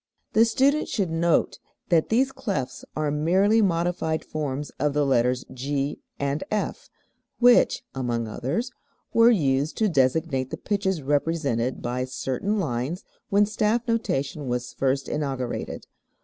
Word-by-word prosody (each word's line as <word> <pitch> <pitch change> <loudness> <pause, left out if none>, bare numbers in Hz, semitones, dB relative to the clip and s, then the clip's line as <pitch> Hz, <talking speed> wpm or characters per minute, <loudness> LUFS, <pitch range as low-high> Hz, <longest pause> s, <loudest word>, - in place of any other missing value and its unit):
] - - -47
The 225 +1 +6
student 275 +6 +2
should 190 -6 -1
note 165 +1 +1 0.3
that 165 -3 +3
these 260 +4 +2
clefs 135 - -4
are 155 -1 0
merely 190 +9 +3
modified 170 -3 0
forms 145 -2 -4
of 145 +1 +1
the 145 0 +2
letters 125 -1 +2
G 140 +2 -2 0.2
and 140 +1 -1
F, 215 - -3 0.5
which 245 0 +5
(among 120 -3 -2
others) 145 - -2 0.4
were 230 +1 +7
used 145 - +1
to 220 - +3
designate 135 -2 +1
the - - -5
pitches 190 -6 -1
represented 140 -4 0
by 125 +1 -1
certain 135 +10 -2
lines 150 - -2 0.3
when 205 +1 +4
staff 215 +3 0
notation 150 - -1
was 125 0 -3
first 135 0 0
inaugurated. 135 -5 -3
155 Hz, 135 wpm, -25 LUFS, 135-200 Hz, 0.5 s, were